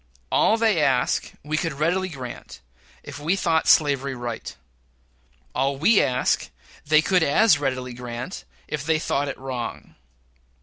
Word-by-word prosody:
All 220 - +3
they 220 -6 +2
ask 130 -2 +1
we 155 +2 -2
could 165 -1 -1
readily 175 +6 0
grant 130 - -9 0.4
if 145 0 -9
we 160 +6 +1
thought 165 -4 +1
slavery 140 -3 +3
right; 120 -2 -6 1.0
all 135 +1 0
we 200 +9 +4
ask 125 0 0 0.3
they 155 +1 +4
could 185 +1 +2
as 160 +3 +4
readily 130 -3 -2
grant, 120 - -7 0.2
if 150 -2 -4
they 160 +1 +1
thought 145 -2 -1
it 140 - -5
wrong. 130 -3 -6
145 Hz, 140 wpm, -24 LUFS, 130-165 Hz, 1.0 s, we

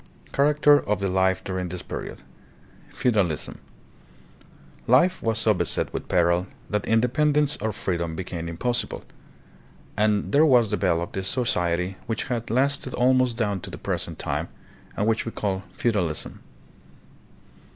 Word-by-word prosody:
Character 145 +1 +4
of 105 -5 -1
the 100 - -1
Life 95 0 +2
during 95 -1 -3
this 90 0 -6
Period. - - -7 0.7
Feudalism. 100 - 0 1.3
Life 170 +10 +4
was 115 -1 0
so 110 -1 +3
beset 90 - -1
with - - -5
peril 85 +1 +2 0.2
that 105 -1 -1
independence 145 +6 +2
or 110 +1 -2
free 95 -3 -2
dom 85 -1 -3
became 85 -2 -5
impossible, 120 +9 -1 0.9
and 105 -2 +1
there 145 +6 +5
was 125 -8 +4
developed 90 -4 0
a 95 - -2
so 125 +6 0
ciety 90 -3 0
which 115 0 -1
has 120 -2 -2
lasted 130 +2 0
almost 125 -1 +3
down 105 -4 0
to - - -8
the - - -8
present - - -4
time, - - -3 0.5
and 105 - +1
which 115 0 +1
we 115 - -5
call 95 -3 -2 0.2
Feudalism. 95 -10 -1
105 Hz, 140 wpm, -25 LUFS, 95-125 Hz, 1.3 s, there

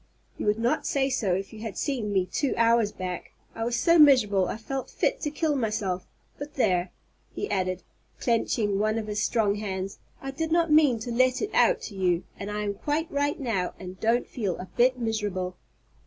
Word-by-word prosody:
"You - - -2
would 210 +1 +3
not 235 +2 0
say 275 -1 +1
so 210 -8 +1
if 195 +3 -5
you 220 - -9
had 220 -4 -6
seen 245 -8 -1
me 190 -2 +2
two 275 +8 -1
hours 230 -2 +4
back. 180 -2 -6 0.2
I 225 - -4
was 235 +1 0
so 335 +7 +4
miserable 215 -11 +6
I - - -3
felt 265 +4 -5
fit - - 0
to 300 - -1
kill 305 0 0
myself; 215 -7 -1 0.3
but 290 +1 -7
there," 185 -8 +1 0.4
he 410 - -2
added, 185 -1 -1 0.4
clenching 220 -4 +1
one 215 +1 +1
of 220 - -2
his 210 -1 -2
strong 210 -2 +2
hands, 195 -2 -4 0.2
"I 270 - -5
did 320 +3 -3
not 335 -1 +3
mean 300 -6 +5
to 240 - -4
let 255 +2 +3
it 420 - -2
out - - +4
to 205 - -7
you, 180 -2 +1 0.2
and 200 - -5
I 210 0 -2
am 205 -1 -1
quite 300 - -2
right 285 +1 0
now 220 -9 -1
and 185 -1 -8
I - - -27
don't 230 +2 +2
feel 200 -8 -3
a 185 - -9
bit 255 +1 +4
miserable." 205 -6 -2
225 Hz, 210 wpm, -27 LUFS, 195-270 Hz, 0.4 s, miserable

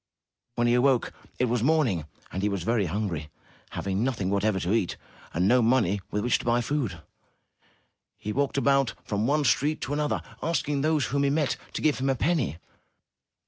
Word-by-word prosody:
When 120 - +1
he 120 - +3
awoke, 125 0 +3 0.2
it 125 - +2
was 120 -1 0
morning, 125 - +2 0.3
and 95 - -3
he 105 - +1
was 100 -4 -2
very 110 -2 +1
hungry. 85 -5 -3 0.4
Having 95 +2 -2
nothing 110 -7 -1
whatever 100 0 +1
to 90 +3 0
eat 115 -6 0 0.3
and 90 +4 +1
no 125 +3 +5
money 110 -5 +2
with 105 0 -2
which 120 - +2
to - - -8
buy 120 0 +3
food, 115 - -2 1.1
he 105 - -4
walked 140 +2 0
about 135 -3 +2
from 105 +2 -1
one 150 +2 +2
street 145 +5 +2
to 140 - -3
another, 150 0 -1 0.2
asking 145 -3 0
those 155 -3 +2
whom 140 +3 0
he 140 - +3
met 145 -2 +1 0.2
to - - -4
give 150 -3 +2
him 135 +1 0
a 135 - +2
penny. 145 - 0
120 Hz, 185 wpm, -27 LUFS, 100-140 Hz, 1.1 s, no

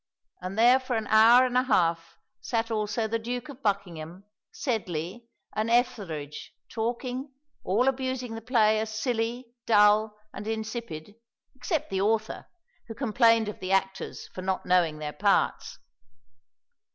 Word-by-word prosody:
And 185 +3 -6
there 245 +3 +6
for 255 -2 -3
an 220 -1 -1
hour 230 +4 +7
and 250 -1 -3
a 250 - +5
half 170 -9 0 0.2
sat 230 -1 -2
also 220 +1 -1
the 230 +1 -1
Duke 245 +4 -5
of 275 -1 -11
Buckingham, 185 - -3 0.3
Sedley, 225 - -3 0.3
and 215 +1 -1
Etherege 195 - -1 0.2
talking; 245 +4 -3 0.3
all 225 +8 +1
abusing 260 -2 -1
the 225 - -6
play 220 -3 +3
as 220 0 -2
silly, 240 0 -2
dull, 210 0 +4 0.2
and 210 - -7
insipid, 220 -6 -5 0.4
except 265 - -3
the 190 0 0
author, 220 +1 -1 0.4
who 225 - -7
complained 230 -3 +3
of 210 - -6
the 185 - -4
actors 195 0 -1
for 185 - -8
not 190 0 -2
knowing 175 -4 +2
their 150 -1 -5
parts. - - +1
220 Hz, 140 wpm, -27 LUFS, 195-245 Hz, 0.4 s, hour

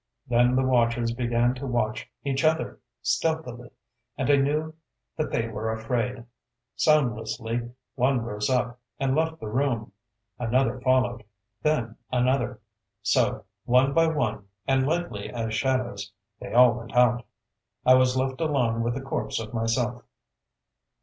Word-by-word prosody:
Then 120 +1 +3
the 130 - +3
watchers 120 -2 +2
began 120 0 +1
to 130 +2 -6
watch 120 -3 -1
each 135 -1 -1
other, 160 +1 +1 0.2
stealthily; 125 -7 -1 0.5
and 135 +1 +1
I - - +7
knew 150 +3 0 0.4
that 155 - -2
they 115 0 -1
were 110 0 -3
afraid. 115 +2 -2 0.5
Soundlessly 120 -5 +1 0.2
one 130 0 +2
rose 105 -1 -2
up, 125 -1 0 0.2
and 135 0 +1
left 160 +1 0
the - - -7
room. 120 -2 -1 0.5
Another 125 +1 +1
followed; 125 -3 +2 0.4
then 120 -8 0
another. 125 0 +1 0.4
So, - - +1 0.2
one 130 +3 +4
by 165 +1 +4
one, 110 -10 -1 0.2
and 135 0 +2
lightly 165 -10 -2
as 115 -2 -3
shadows, 120 -5 -1 0.3
they - - -8
all 125 0 +7
went 120 +1 -8
out. 125 0 +4 0.6
I 130 - +8
was 130 0 +4
left 130 +2 -1
alone 125 -8 +1
with 120 +1 -1
the 135 - -4
corpse 135 -3 -2
of 110 +1 -7
myself. 120 +1 0
125 Hz, 140 wpm, -26 LUFS, 115-135 Hz, 0.6 s, I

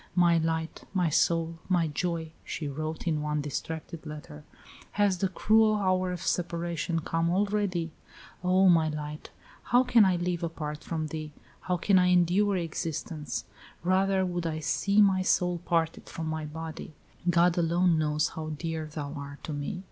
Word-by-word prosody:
"My 170 -2 +5
light, 160 0 -2
my 180 -3 +2
soul, 165 +1 +1
my 175 -3 +3
joy," 160 +1 -2
she 155 - -4
wrote 155 +3 -4
in 155 -3 0
one 150 0 -1
distracted 160 +3 -5
letter, 150 - -9 0.5
"has 200 -3 +2
the 195 - +2
cruel 215 +3 +3
hour 185 -2 +1
of 180 - -5
separation 170 -1 -1
come 165 +1 0
already? 190 -3 0 0.5
O, 185 +1 +4
my 165 -3 +5
light! 150 0 -6 0.4
how 245 +1 +4
can 245 -3 +5
I 190 -2 +4
live 175 0 -1
apart 155 -3 -4
from 160 -2 -3
thee? 155 -1 -6 0.3
How 180 -1 -1
can 190 +2 +4
I 180 - +4
endure 180 +3 +3
existence? 160 - -4 0.4
Rather 190 +1 +2
would 175 -2 -2
I 155 -1 -2
see 200 +6 +3
my 190 -2 +3
soul 180 -1 +1
parted 165 -1 0
from 165 - -5
my 155 -1 -3
body. 160 0 -7 0.3
God 175 0 +4
alone 170 -1 +3
knows 150 0 +1
how 155 -1 -6
dear 160 -1 -3
thou 145 -2 -5
art 140 -1 -8
to 155 - -4
me. 145 +6 -4
170 Hz, 165 wpm, -28 LUFS, 155-185 Hz, 0.5 s, My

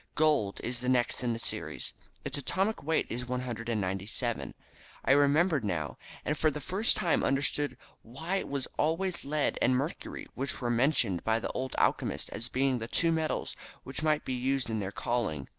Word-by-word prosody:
Gold 150 -10 +3
is 125 +1 -1
the 125 +1 -1
next 125 -1 +2
in 120 -1 +1
the - - -3
series. 115 - -4 0.3
Its - - -1
atomic 190 +9 0
weight 160 +3 +1
is 125 +2 -3
197. 115 -3 -2 0.5
I - - +4
remembered 145 +2 +4
now, 80 -8 -2 0.3
and 150 - +1
for 155 - +3
the 150 0 -4
first 190 - +2
time 170 - +2
understood 140 +1 +1 0.2
why 160 +11 -3
it - - -3
was 140 -2 -2
always 170 +4 +1
lead 150 0 0
and 125 - +4
mercury 140 +6 -3
winch 135 +2 -2
were 120 -2 0
mentioned 120 - +3
by 110 0 +2
the - - -3
old 130 0 -3
alchemists - - +1
as 115 - -1
being 130 -1 +1
the 115 - -4
two 165 +7 +3
metals 160 -1 -1 0.3
which 135 - -5
might 155 -1 +2
be 130 - -1
used 130 0 0
in 110 - 0
their 100 -1 -3
calling. 100 - -1
130 Hz, 180 wpm, -30 LUFS, 115-150 Hz, 0.5 s, I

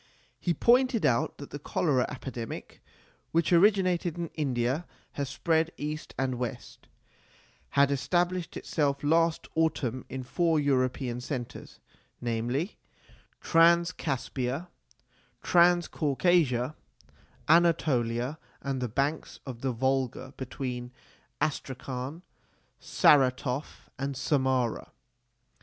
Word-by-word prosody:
He 175 -2 0
pointed 245 - +3
out 115 -2 +1
that 140 - -10
the 145 - -6
cholera 140 -3 +1
epidemic, 125 -4 -7 0.5
which 165 +1 +2
originated 180 -2 +3
in 170 -2 -3
India 135 +1 -1 0.3
and 140 -1 -2
spread 160 +4 +1
east 150 +1 -5
and 130 -2 -1
west, 125 -2 -6 0.9
had 140 0 +5
established 175 +6 0
itself 140 -3 -1
last 165 +2 +2
autumn 140 -6 0
in 130 0 -5
four 165 +4 +1
European 130 -3 0
centres, 125 -2 -6 0.4
namely 120 - -2 0.7
Transcaspia, 165 -4 +2 0.7
Transcaucasia, 170 -5 +3 0.7
Anatolia, 150 -5 +2 0.2
and 135 -2 -2
the 125 - -1
banks 140 +7 -2
of 125 -4 -7
the 135 - 0
Volga 130 +1 -1
between 125 -2 -5 0.5
Astrakhan, 135 +2 -3 0.6
Saratoff, 130 0 +2
and 140 0 -3
Samara. 130 -3 0
140 Hz, 95 wpm, -29 LUFS, 130-165 Hz, 0.9 s, had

